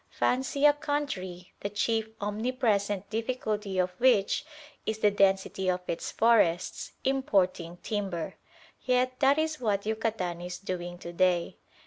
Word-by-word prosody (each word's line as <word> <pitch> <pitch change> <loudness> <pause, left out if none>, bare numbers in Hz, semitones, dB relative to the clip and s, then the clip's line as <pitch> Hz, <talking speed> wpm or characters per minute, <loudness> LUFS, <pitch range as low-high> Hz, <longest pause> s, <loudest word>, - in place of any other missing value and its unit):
Fancy 265 +3 +1
a 295 - +8
country, 200 -13 -3
the 200 - -3
chief 220 +2 0
omnipresent 205 -2 0
difficulty 215 -4 -2
of 180 0 +2
which 235 -6 +3 0.4
is 220 - -2
the 210 -1 +3
density 195 -1 +2
of 180 0 0
its 170 - -3
forests, 205 -7 +2
importing 185 -10 +1
timber! 195 -6 -3 0.5
Yet 255 0 +1
that 275 +1 +5
is 315 -1 0
what 205 -3 0
Yucatan 215 -6 -2
is 180 0 -5
doing 175 -2 -5
to 170 0 -8
day. 180 -1 +1
205 Hz, 130 wpm, -29 LUFS, 185-245 Hz, 0.5 s, a